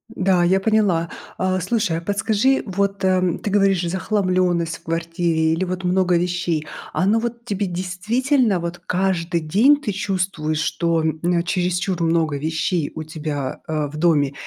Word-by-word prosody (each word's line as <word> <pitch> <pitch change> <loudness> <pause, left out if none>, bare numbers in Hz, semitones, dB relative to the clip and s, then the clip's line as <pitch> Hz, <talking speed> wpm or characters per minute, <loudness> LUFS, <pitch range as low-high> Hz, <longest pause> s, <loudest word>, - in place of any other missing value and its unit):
Да, 185 -2 +2
я 190 +2 +3
поняла. 195 -6 +2 0.3
А, 185 0 0
слушай, 185 -2 0
а - - -4
подскажи, 215 +7 +1
вот, 200 0 -1
эм, 185 -2 +2
ты 205 - -4
говоришь: 195 -3 +3
"Захламлённость 185 -3 0
в - - -26
квартире" 165 -1 0
или 165 - -1
вот 185 +1 -4
"много 180 0 +2
вещей". 175 -3 -1 0.3
Оно 205 +5 +2
вот 235 0 -5
тебе 205 -3 -2
действительно, 205 - 0
вот 170 +1 -5
каждый 175 -2 0
день 210 - +4
ты 245 -8 -3
чувствуешь, 185 -6 -2
что, 165 -1 0
м, 170 +2 0
чересчур 180 0 -1
много 165 -3 +1
вещей 160 +1 -1
у 160 - -4
тебя, 150 -3 -4
а, 155 -2 -1
в 150 - -9
доме, 150 -4 +2
180 Hz, 155 wpm, -21 LUFS, 165-195 Hz, 0.3 s, день